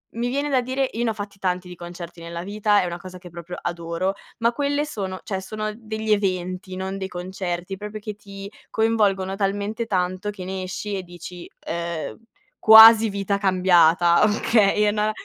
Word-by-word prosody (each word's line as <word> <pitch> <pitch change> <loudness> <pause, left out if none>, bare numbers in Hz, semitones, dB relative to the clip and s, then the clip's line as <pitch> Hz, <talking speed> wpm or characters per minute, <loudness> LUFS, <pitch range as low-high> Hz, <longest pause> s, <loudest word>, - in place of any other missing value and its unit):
mi 235 +1 -1
viene 280 +3 -1
da 265 -3 +2
dire: 260 +2 -1
"Io 230 - -2
ne 235 - +1
ho - - -4
fatti 205 -2 -8
tanti 180 -1 -1
di 180 - -9
concerti 175 0 -9
nella 170 0 -6
vita, 205 +1 +2
è - - -1
una 170 -1 -4
cosa 185 0 -10
che 180 0 -12
proprio 170 +1 -8
adoro". 170 +2 -2 0.3
Ma 235 +1 +2
quelle 285 +2 0
sono, 190 -9 -5
cioè 190 -3 -4
sono 215 +2 -4
degli 220 -1 -4
eventi, 185 -2 -2
non 190 +1 -4
dei 190 -1 -5
concerti, 180 0 -5
proprio 210 +1 -7
che 210 0 -6
ti 200 -1 -10 0.2
coinvolgono 205 -4 +1
talmente 205 +3 -2
tanto 185 +1 -1
che 190 -3 -8
ne 190 0 -4
esci 200 +2 -4
e 190 - -5
dici: 175 0 -10 0.2
"Uhm, 170 -1 -4 0.4
quasi 220 0 +9
vita 200 0 -1
cambiata". 175 -3 +4
Okay, 210 -1 +2
è 210 - +3
na 210 0 0
195 Hz, 185 wpm, -23 LUFS, 180-215 Hz, 0.4 s, quasi